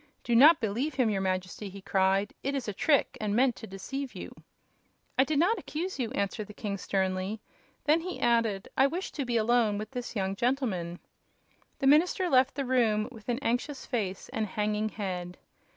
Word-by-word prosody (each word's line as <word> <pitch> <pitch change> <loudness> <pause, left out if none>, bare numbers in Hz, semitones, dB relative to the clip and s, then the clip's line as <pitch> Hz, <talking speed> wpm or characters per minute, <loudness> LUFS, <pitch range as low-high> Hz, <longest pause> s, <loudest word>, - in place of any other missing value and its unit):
"Do 240 - +1
not 300 +7 +8
believe 245 +7 -1
him, 250 -5 +2
your 195 -2 0
Majesty!" 185 +2 -2
he 200 +1 -10
cried. 195 +1 +1
"It 275 +1 -2
is 270 - -3
a 210 - -2
trick, 285 +7 +2
and 210 -1 0
meant 250 0 +3
to 220 - -8
deceive 265 +8 -6
you." - - -7 0.8
"I 260 - +5
did 300 +2 -1
not 370 +9 +3
accuse 345 +2 -4
you," 240 -3 -1
answered 200 +1 -2
the 210 - -12
king, 200 -3 -4
sternly. 190 +2 -1 0.4
Then 310 +2 +3
he 365 +2 -5
added: 230 -5 +1
"I 270 - +5
wish 350 +6 -4
to 280 - -3
be 240 -1 0
alone 225 -2 +2
with 215 +4 -6
this 245 -2 -5
young 195 -1 -1
gentleman." 210 -9 -1 0.8
The - - -2
minister 345 +5 +4
left 260 +1 +4
the 275 - -2
room 230 -3 +2
with 225 -1 -11
an 240 - +1
anxious 255 +3 -1
face 200 -7 -3
and 220 -1 -2
hanging 210 +2 -1
head. 180 -4 -5
230 Hz, 190 wpm, -29 LUFS, 200-270 Hz, 0.8 s, not